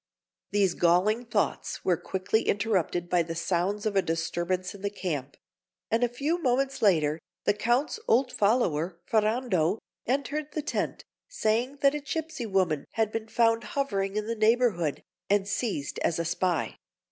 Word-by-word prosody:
These 200 -3 +2
galling 190 +8 +3
thoughts 215 -3 -1
were 180 - +4
quickly 190 +6 -1
interrupted 190 -5 +1
by 175 0 +3
the 165 0 -4
sounds 180 +5 -1
of 210 -2 0
a 195 - +5
disturbance 175 +2 -2
in 200 - -12
the 200 - -1
camp; 155 -9 -4 0.5
and 230 +2 +2
a 245 - +3
few 290 +8 -1
moments 270 0 +1
later, 160 -6 +3 0.2
the - - +3
Count's 240 - 0
old 250 +2 +3
follower, 185 -7 +1
Ferrando, 215 -5 +1 0.3
entered 285 +3 -1
the 305 - -2
tent, - - -2 0.2
saying 250 - 0
that 275 0 +5
a 295 - -2
gipsy 295 -3 -4
woman 185 -7 +1
had 220 -2 +1
been 225 0 -3
found 230 0 +2
hovering 200 -8 -1
in 215 0 -1
the 230 - -1
neighbourhood, 220 - +2 0.3
and 200 -1 +2
seized 200 - -2
as 165 - 0
a 170 - -1
spy. 175 +1 -1
205 Hz, 160 wpm, -28 LUFS, 175-240 Hz, 0.5 s, a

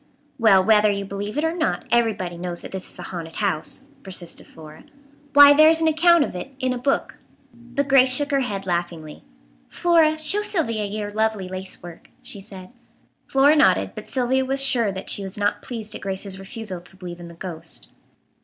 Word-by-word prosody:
"Well, 200 -5 +5
whether 210 0 +4
you 200 -1 -2
believe 200 +4 -5
it 300 - 0
or 325 0 0
not, 320 -3 -1
everybody 220 -7 +1
knows 175 0 -4
that - - -9
this 190 -1 -6
is - - -10
a - - -8
haunted 165 -3 -7
house," 200 +6 -3 0.2
persisted 185 -5 -7
Flora. 155 -1 -14 0.5
"Why, 285 0 +9
there 310 +2 +7
is 325 0 +3
an 325 - +2
account 335 +1 +4
of - - -5
it 265 +10 -7
in 255 -2 -1
a - - -4
book." 275 +2 -1 0.3
But 245 +4 -4
Grace 265 -2 +5
shook 285 +3 +2
her 275 - +2
head 205 -7 -3
laughingly. 170 -3 -4 0.5
"Flora, 330 -3 +3
show 315 +7 0
Sylvia 290 - -1
your 205 0 -4
lovely 220 -2 -1
lace 185 0 -7
work," 175 -1 -12
she 210 -4 -7
said. 190 -1 -10 0.6
Flora 280 +3 +4
nodded, 300 - +3
but - - -9
Sylvia 260 0 0
was 270 +1 0
sure 235 -6 +2
that 190 0 -5
she - - -1
was 195 0 -5
not 205 0 0
pleased 220 -3 -6
at - - -8
Grace's 195 0 -4
refusal 195 -2 -7
to 175 +2 -14
believe 175 -2 -8
in 175 - -9
the 170 - -12
ghost. 170 -2 -6
210 Hz, 200 wpm, -22 LUFS, 185-270 Hz, 0.6 s, Why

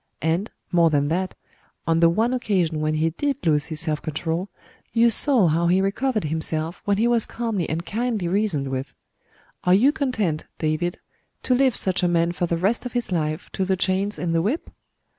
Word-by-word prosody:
And, 165 +7 0 0.2
more 170 -2 +4
than 145 -1 +1
that, 185 +3 -1 0.5
on 165 0 +2
the 170 0 +6
one 225 +8 +1
occasion 185 -10 0
when 155 0 0
he 160 +1 +1
did 280 - -1
lose 150 -1 +2
his 155 -2 -1
self 155 -2 -1
control, 165 +4 -3 0.4
you 230 0 +4
saw 245 -5 +4
how 165 +2 +2
he 180 +2 +3
recovered 215 +4 0
himself 160 +2 -2
when 200 -1 +2
he 225 +3 +2
was 235 -2 +3
calmly 225 -7 -2
and 165 +2 -3
kindly 225 -4 -2
reasoned 175 -8 0
with. 130 0 -4 0.7
Are 180 +1 +5
you 255 +9 +5
content, 220 - -1
David, 160 +3 -1 0.5
to 255 - +2
leave 260 -1 +3
such 185 -1 +1
a 180 - +2
man 170 0 +2
for 175 0 -2
the 170 - 0
rest 195 +7 +1
of 250 - -6
his 240 -5 -2
life 155 -1 -2
to 190 - -2
the 190 0 0
chains 195 +3 0
and 170 -1 -2
the 165 - +2
whip?' 235 - -2
180 Hz, 200 wpm, -23 LUFS, 160-220 Hz, 0.7 s, the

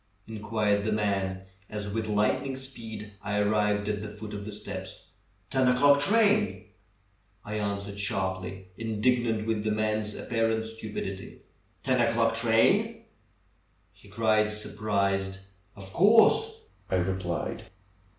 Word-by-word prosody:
'^ 110 - -6
inquired 105 -1 0
the 110 - 0
man, 100 -3 -1 0.3
as 105 -1 -4
with 110 +2 -2
light 105 0 +2
ning 135 -1 -4
speed 115 -5 -8
I 105 0 -1
arrived 105 0 +1
at 105 -1 -1
the 105 - -5
foot 105 0 -8
of 100 -1 -6
the 105 - -6
steps. 100 -2 -8 0.4
"Ten 130 -1 +3
o'clock 140 +3 +5
train 210 - +3 0.3
!" 100 -1 -37
I 105 +1 -3
answered 100 -1 -3
sharply, 95 -1 -2
indignant 115 0 +1
with 110 -2 -1
the 110 - 0
man's 110 0 0
apparent 115 -1 0
stupidity. 110 -3 -6 0.4
"Ten 130 -2 +2
o'clock 115 -1 +2
train!" 190 - +2 0.9
he - - -19
cried 110 0 +2
surprised. 100 -2 -1 0.4
"Of 95 -1 -11
course!'^ 230 - +5 0.3
I - - +1
replied. 90 -1 -2
105 Hz, 130 wpm, -28 LUFS, 100-115 Hz, 0.9 s, o'clock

